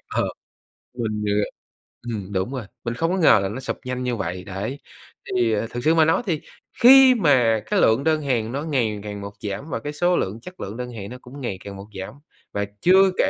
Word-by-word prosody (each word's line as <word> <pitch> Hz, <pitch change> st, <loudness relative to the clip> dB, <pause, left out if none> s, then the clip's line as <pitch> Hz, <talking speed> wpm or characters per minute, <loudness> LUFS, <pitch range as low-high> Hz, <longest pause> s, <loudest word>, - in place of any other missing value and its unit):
ờ, -, -, +2 dB, 0.7 s
mình, 110 Hz, -3 st, -2 dB
à 105 Hz, 0 st, +2 dB, 0.7 s
ừm 100 Hz, -3 st, -5 dB
đúng 95 Hz, +5 st, -1 dB
rồi, 125 Hz, -5 st, -4 dB, 0.2 s
mình 120 Hz, -, -2 dB
không 165 Hz, +7 st, 0 dB
có 190 Hz, -, 0 dB
ngờ 160 Hz, -, +6 dB
là 95 Hz, -, -1 dB
nó 120 Hz, +5 st, -5 dB
sụp 130 Hz, -, -4 dB
nhanh 125 Hz, 0 st, -3 dB
như 125 Hz, -1 st, -1 dB
vậy. 90 Hz, -3 st, -4 dB
Đấy. 105 Hz, +8 st, -5 dB, 0.6 s
Thì, 120 Hz, -3 st, +2 dB
à, 110 Hz, +2 st, -1 dB
thực 120 Hz, 0 st, -4 dB
sự 160 Hz, +1 st, +4 dB
mà 160 Hz, -1 st, +5 dB
nói 165 Hz, -, +3 dB
thì 165 Hz, -7 st, -1 dB, 0.4 s
khi 260 Hz, +1 st, +9 dB
mà 125 Hz, -, +3 dB
cái -, -, +1 dB
lượng 115 Hz, +5 st, +4 dB
đơn 155 Hz, -1 st, +2 dB
hàng 120 Hz, -5 st, -1 dB
nó 140 Hz, +3 st, -3 dB
ngày 120 Hz, -9 st, 0 dB
càng 105 Hz, -1 st, -6 dB
một 100 Hz, 0 st, -6 dB
giảm 105 Hz, +9 st, -5 dB
và -, -, -2 dB
cái 145 Hz, 0 st, -5 dB
số 175 Hz, +4 st, +2 dB
lượng, 105 Hz, +5 st, -2 dB
chất 180 Hz, +7 st, -11 dB
lượng 100 Hz, +4 st, -5 dB
đơn 125 Hz, 0 st, -5 dB
hàng 100 Hz, -4 st, -7 dB
nó 125 Hz, -, -8 dB
cũng 135 Hz, +3 st, -11 dB
ngày 120 Hz, -7 st, -3 dB
càng 100 Hz, -1 st, -8 dB
một 100 Hz, -, -9 dB
giảm 95 Hz, -, -6 dB, 0.4 s
và 100 Hz, 0 st, -1 dB, 0.2 s
chưa 190 Hz, +1 st, +6 dB
kể -, -, +3 dB
120 Hz, 235 wpm, -23 LUFS, 105-150 Hz, 0.7 s, khi